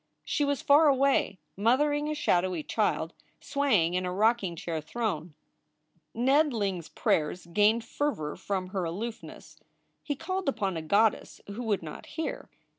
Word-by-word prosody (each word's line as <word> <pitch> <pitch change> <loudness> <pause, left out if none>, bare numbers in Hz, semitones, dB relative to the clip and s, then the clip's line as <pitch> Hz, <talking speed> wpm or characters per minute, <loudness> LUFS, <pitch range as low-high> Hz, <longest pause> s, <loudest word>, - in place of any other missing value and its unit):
She 295 - 0
was 285 -1 0
far 295 +2 +6
away 275 -7 +3 0.2
mothering 290 +8 +2
a 305 - -1
shadowy 180 - +1
child, 170 -6 0 0.3
swaying 265 - +1
in 180 0 0
a 180 - -2
rocking 210 -2 +1
chair 165 -1 -4
throne. 170 -4 -3 0.8
Ned 275 +5 +3
Ling 200 -5 -1
s 165 - -11
prayers 160 +3 0
gained 210 +6 +2
fervor 230 - -2
from 190 0 -3
her 190 -1 -2
aloofness. 210 +8 -6 0.4
He 290 - -3
called 345 +2 -2
upon 195 -8 -1
a 165 - -3
goddess 205 +7 +1
who 205 +4 -5
would 205 -5 0
not 155 - -8
hear. 320 - -5
210 Hz, 150 wpm, -28 LUFS, 180-275 Hz, 0.8 s, far